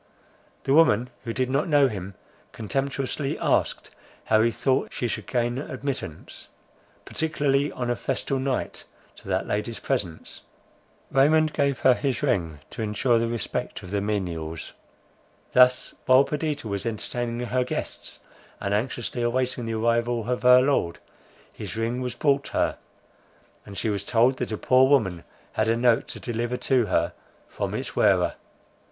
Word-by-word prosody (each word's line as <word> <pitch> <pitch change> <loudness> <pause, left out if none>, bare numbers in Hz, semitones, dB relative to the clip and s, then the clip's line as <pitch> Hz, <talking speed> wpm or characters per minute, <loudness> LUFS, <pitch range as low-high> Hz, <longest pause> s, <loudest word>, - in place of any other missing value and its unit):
The 135 - +1
woman, 125 -6 +4
who 115 - -2
did 130 +2 0
not 140 +5 +1
know 145 -3 +5
him, 100 -4 -6 0.4
contemptuously 135 +4 -2
asked, - - 0 0.3
how 110 0 +3
he 115 - +4
thought 130 +4 0
she 120 - -2
should - - -4
gain 120 +1 0
admittance, 135 - -6 0.6
particularly 145 -3 0
on 120 -1 -2
a - - +1
festal 135 +3 -2
night, 130 -1 -2 0.3
to - - -14
that - - 0
lady's 110 +2 -2
presence? 95 -12 -3 0.7
Raymond 155 +3 +4
gave 140 -2 0
her 130 - +6
his 130 -1 -2
ring 80 -5 0
to - - -6
ensure 115 +3 +2
the 115 - 0
respect 115 -4 -4
of 90 - -9
the 100 -1 0
menials. 85 -6 -3 0.8
Thus, 125 0 +5
while 130 +1 +7
Perdita 150 -3 -3
was 100 +2 -3
entertaining 120 +2 -3
her 125 +1 +1
guests, 125 - -5 0.4
and 100 - -2
anxiously 120 +2 -2
awaiting 120 0 -1
the 115 - -2
arrival 115 0 +1
of 125 0 -1
her 125 0 +7
lord, 135 -11 +1 0.6
his - - -7
ring 115 +3 -1
was 125 -1 -3
brought 140 -2 +1
her; - - 0 0.9
and 100 -1 -9
she 110 - 0
was 100 -1 -2
told 120 +5 +3
that 125 - -3
a 110 - -2
poor 130 +3 +4
woman 95 -12 +2 0.3
had 110 - +1
a 115 +1 +2
note 120 -1 +3
to - - -7
deliver 120 +1 -2
to 125 -4 +2
her 90 - +1 0.3
from - - -4
its - - -5
wearer. - - +3
120 Hz, 155 wpm, -25 LUFS, 110-135 Hz, 0.9 s, while